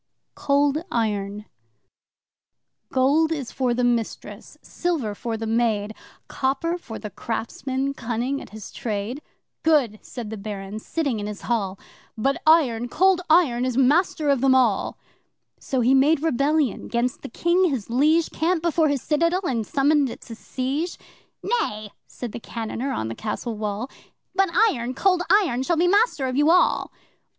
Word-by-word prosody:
Cold 285 +2 +1
Iron 210 -2 -1 1.5
'Gold 285 +5 +3
is 285 -7 -3
for 255 -2 0
the 250 - 0
mistress 235 -2 -2
silver 315 -12 -2
for 225 +2 -4
the 225 - -4
maid! 220 -2 0 0.3
Copper 280 +6 -1
for 225 -8 -8
the 210 - -7
craftsman 260 +6 -3
cunning 245 +2 -2
at - - -11
his 215 -2 -10
trade.' 220 +5 -4 0.4
'Good!' 270 -10 +2
said 230 -4 -7
the 220 - -5
Baron, 200 0 -6
sitting 275 -2 -2
in 205 - -4
his 210 -1 -7
hall, 200 -5 -1 0.4
'But 270 +5 0
Iron 245 -8 +4
Cold 375 +5 +3
Iron 300 -8 +4
is 255 -1 -1
master 295 +3 +3
of 275 -3 +2
them 265 -1 +4
all!' 240 -6 +2 0.6
So 260 -2 -1
he 245 +3 +4
made 285 +3 +4
rebellion 290 -3 +1
'gainst 240 +1 -1
the - - -7
King 345 +9 +2
his 255 -8 -3
liege, 310 +6 +3
Camped 330 +1 0
before 330 -2 +2
his 280 -3 -1
citadel 335 +4 +1
and 235 - -1
summoned 285 0 +2
it - - -9
to 235 - -10
siege 270 +9 -3 0.5
'Nay!' 215 - -2 0.2
said 245 -3 -7
the 240 - -6
cannoneer 230 +3 -4
on 110 - -2
the 115 - -4
castle 220 - -4
wall, 210 +2 -3 0.5
'But 390 0 +2 0.2
Iron 245 +1 -4
Cold 365 +3 +2
Iron 360 - +3
shall 330 +5 0
be 340 - +3
master 405 - +2
of 255 -1 -2
you 295 +3 +3
all! 360 +2 +3
260 Hz, 160 wpm, -23 LUFS, 225-310 Hz, 1.5 s, Iron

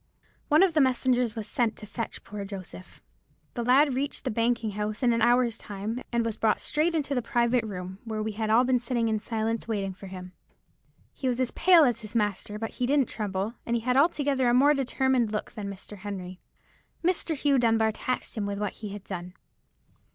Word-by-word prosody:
"One 305 +4 +5
of 375 -4 +3
the 310 - +4
messengers 250 -3 +2
was 220 -2 -4
sent 230 0 0
to 210 - -10
fetch 225 +2 -6
poor 205 0 -6
Joseph. 190 -2 -9 0.5
The 240 - -3
lad 265 +4 +4
reached 275 +3 -2
the - - -1
banking 230 0 0
house 210 +3 -3
in 240 -1 +4
an 230 - 0
hour's 240 0 +3
time, 210 +4 -5
and 235 -1 +1
was 225 -1 -2
brought 220 -1 +2
straight 320 +3 0
into 290 -3 -1
the 250 - +1
private 235 +1 +1
room, 190 -2 -6
where 220 -2 -3
we 220 - -2
had 215 +1 -3
all 225 +3 +5
been 255 -1 +2
sitting 235 -1 0
in 215 -1 0
silence, 225 +1 -2
waiting 200 -4 -2
for 195 +1 -11
him. 185 -1 -8 0.8
"He 265 - -4
was 250 -1 0
as 255 -2 +1
pale 350 -2 +6
as 245 -5 +2
his 215 +1 -9
master, 210 -1 -1
but 225 +1 -4
he 250 - -2
didn't 280 -2 +2
tremble, 205 0 -3
and 235 - -1
he 235 - 0
had 250 +1 +1
altogether 280 -3 +3
a 240 - +3
more 285 +4 +6
determined 265 -4 +1
look 210 - -3
than 205 -2 -6
Mr. 200 +1 -9
Henry. 185 -2 -6 0.6
"Mr. 345 -2 0
Hugh 280 -1 +2
Dunbar 225 -2 +3
taxed 255 +4 -3
him 210 -3 -2
with 200 0 -3
what 210 0 -2
he 210 - -5
had 200 -1 -8
done. 180 -2 -7
230 Hz, 210 wpm, -27 LUFS, 210-255 Hz, 0.8 s, pale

